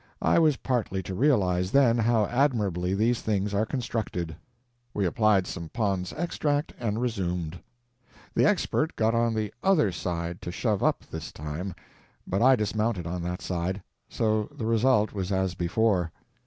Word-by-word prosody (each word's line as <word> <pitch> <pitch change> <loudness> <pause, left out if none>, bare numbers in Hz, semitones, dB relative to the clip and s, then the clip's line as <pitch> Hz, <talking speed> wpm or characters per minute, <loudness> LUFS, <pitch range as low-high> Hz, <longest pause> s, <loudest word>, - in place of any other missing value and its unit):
I - - +4
was 155 -5 +4
partly 110 -7 -1
to 95 - -5
realize, 95 -7 +2
then, 120 -1 +4
how 115 -1 +3
admirably 100 - +1
these 115 +4 +1
things 105 -1 -1
are 105 +2 +1
constructed. 110 - -3 0.6
We 100 - +1
applied 100 +1 +3
some 85 -3 -6
Pond's 100 -5 -1
Extract, 150 -3 -1
and 110 -2 -1
resumed. 90 -8 -2 0.7
The - - +3
Expert 170 -5 +1
got 110 0 +2
on 115 -1 +2
the 110 -1 -2
_other 185 - +4
_side 85 0 -3
to 85 - -6
shove 105 +1 0
up - - +1
this 80 -2 -6
time, 75 +5 -5 0.5
but 95 - -1
I 130 +2 +7
dismounted 105 -3 -1
on 90 +1 -3
that 90 +1 -4
side; 90 +2 -2 0.3
so 110 -1 0
the 110 - -5
result 115 -1 +3
was 95 -2 -3
as 95 -1 +1
before. 90 -1 +1
105 Hz, 155 wpm, -27 LUFS, 90-115 Hz, 0.7 s, I